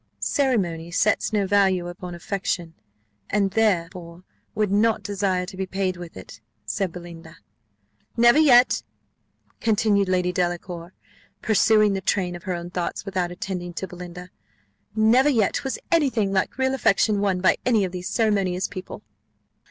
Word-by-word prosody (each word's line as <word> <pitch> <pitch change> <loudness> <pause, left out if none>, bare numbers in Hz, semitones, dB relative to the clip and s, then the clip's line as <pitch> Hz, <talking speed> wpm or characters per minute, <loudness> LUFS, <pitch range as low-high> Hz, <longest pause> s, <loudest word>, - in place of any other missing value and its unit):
"Ceremony 185 - 0
sets 205 +6 +1
no 205 -2 +1
value 190 -2 +2
upon 175 0 -7
affection, 175 -2 -3 0.6
and 200 -1 +1
therefore 180 -4 -1 0.3
would 210 -2 0
not 215 +2 +2
desire 195 -3 -1
to 190 +1 -10
be 190 0 -3
paid 190 -1 -2
with 175 - -10
it," 105 +4 -12 0.2
said 190 - -2
Belinda. 165 -2 -11 0.8
"Never 240 +5 +6
yet," 255 -5 +5 0.8
continued 210 -3 +2
lady 180 -1 +1
Delacour, 175 0 -3 0.5
pursuing 215 -1 +4
the 195 - -2
train 185 -2 -1
of 175 - -9
her 185 -2 -2
own 170 0 -7
thoughts 180 +2 -3
without 185 -3 -2
attending 175 -1 -5
to 190 - -4
Belinda, 180 0 -10 0.6
"never 235 +6 +4
yet 225 -8 +1
was 270 - -3
any 325 -5 +4
thing 210 -6 -1
like 190 +4 0
real 265 0 +1
affection 210 -4 +2
won 195 -3 +1
by 185 - +3
any 225 -5 +2
of 185 - -5
these 180 +1 -5
ceremonious 195 -5 0
people." 185 -1 -9
190 Hz, 150 wpm, -23 LUFS, 180-215 Hz, 0.8 s, Never